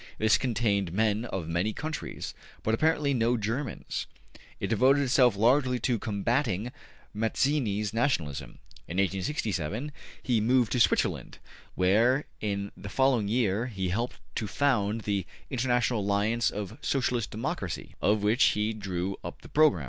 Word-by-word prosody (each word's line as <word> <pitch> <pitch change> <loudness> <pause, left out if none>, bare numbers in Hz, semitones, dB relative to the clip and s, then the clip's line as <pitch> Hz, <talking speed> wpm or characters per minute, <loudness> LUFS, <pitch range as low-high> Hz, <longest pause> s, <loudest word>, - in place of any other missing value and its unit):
'' - - -25
This 110 0 +4
contained 105 -7 0
men 110 +3 +1
of 95 -8 -4
many 85 +6 0
countries, 155 +5 -5 0.3
but 110 - +1
apparently 150 +2 +2
no 120 0 +2
Germans. 115 +5 -3 0.5
It - - -2
devoted 130 +6 +4
itself 125 -3 +4
largely 125 +4 +3
to 120 -2 +1
combating 115 +1 -1 0.4
Mazzini's 110 -2 0
nationalism. 75 - -1 0.3
In 85 - -5
1867 100 - -1 0.3
he 120 -4 +2
moved 120 0 +3
to 125 - +1
Switzerland, - - +1 0.4
where 115 +10 +3
in 100 -1 -2
the 100 - -8
following 130 -2 +2
year 110 0 +1
he 95 -6 -3
helped 115 +7 -2 0.2
to 110 - -2
found 110 -2 +1
the 100 -3 -2 0.2
``International 125 -2 +1
Alliance 105 +3 +1
of 105 +5 -6
So 135 - 0
cialist 120 -3 -1
Democracy,'' 105 - -4
of 105 0 +2
which 110 +5 +3
he 105 +1 0
drew 95 -2 -3
up - - -8
the - - -12
program. 155 - +4
110 Hz, 145 wpm, -28 LUFS, 100-125 Hz, 0.5 s, This